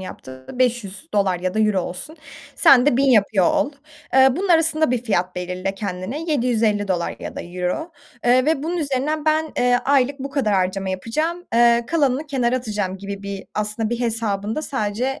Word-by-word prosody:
yaptığı? 130 -8 -10
$500 205 -6 -1
ya 185 +1 -2
da 220 - +1
euro 210 -3 +2
olsun. 185 - -6 0.4
Sen 275 -6 +6
de 295 - +3
1000 275 - +3
yapıyor 205 -5 +3
ol. - - +1 0.4
Eee, 265 0 +7
bunun 385 +3 -2
arasında 320 -3 +3
bir 250 - +1
fiyat 185 -6 -1
belirle 180 +2 -3
kendine, 195 - -5
$750 215 - 0
ya - - -7
da - - -4
euro, 180 - -4 0.3
eee, 250 +1 +4
ve 300 -1 +1
bunun 340 +3 -2
üzerinden 295 0 -1
ben, 310 0 +1
eee, 245 0 +3
aylık 275 0 +2
bu 275 +1 -5
kadar 265 -7 0
harcama 190 +1 0
yapacağım, 310 - -2
eee, 235 0 +4
kalanını 285 -1 +1
kenara 255 -3 0
atacağım 210 -6 -3
gibi 200 0 -7
bir 200 -1 -6
aslında 215 +1 -2
bir 240 0 -2
hesabında 225 +2 -1
sadece 255 0 -2
235 Hz, 170 wpm, -21 LUFS, 195-275 Hz, 0.4 s, Eee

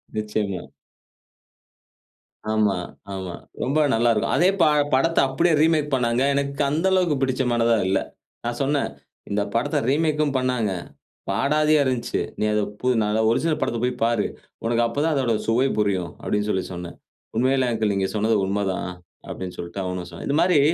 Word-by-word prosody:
நிச்சயமா. 105 -4 -2 1.9
ஆமா, 105 -2 +2 0.4
ஆமா. 95 -2 -5 0.3
ரொம்ப 135 +4 0 0.2
நல்லா 115 +1 +3
இருக்கும்! 105 - 0
அதே 180 +4 +5
பா - - +6 0.3
படத்த 165 +6 +3
அப்டியே 160 +6 +2
ரீமேக் 155 -3 +2
பண்ணாங்க. 120 -1 +1
எனக்கு 140 0 -1
அந்த 155 +5 0
அளவுக்கு 180 -5 +3
புடிச்சமானதா 120 -3 +2
இல்ல. 95 - +2 0.5
நான் 120 0 -3
சொன்னேன், 140 +1 0 0.4
இந்த 100 +1 0
படத்த 115 - +1
ரீமேக்கும் 150 -1 +1
பண்ணாங்க. 125 -5 0 0.6
பாடாதியா 150 +1 +3
இருந்துச்சு. 125 -3 -1 0.2
"நீ - - 0
அத 105 - +2 0.2
போ 125 - -1
நா 105 - +1
தான் 110 0 +2
ஒரிஜினல் 155 +6 +1
படத்த 120 - 0
போய் 125 0 +1
பாரு. 115 -2 +2 0.4
உனக்கு 120 0 +2
அப்போதான் 150 +7 0
அதோட 130 -4 +1
சுவை 120 +4 +3
புரியும்" 95 -5 0
அப்டின்னு 105 0 -1
சொல்லி 95 -2 0
சொன்னேன். 85 -1 -7 0.4
"உண்மையில 130 +1 +2
அங்கிள் 110 -2 0
நீங்க 95 -1 0
சொன்னது 110 +1 +2
உண்மதான்" 95 -2 -1 0.4
அப்டின்னு 90 -1 -6
சொல்லிட்டு 85 +3 -5
அவனும் 90 -1 -4
சொன்னான். 85 - -7
இந்த 145 - +2
மாரி 175 -3 +4
120 Hz, 155 wpm, -23 LUFS, 105-140 Hz, 1.9 s, பா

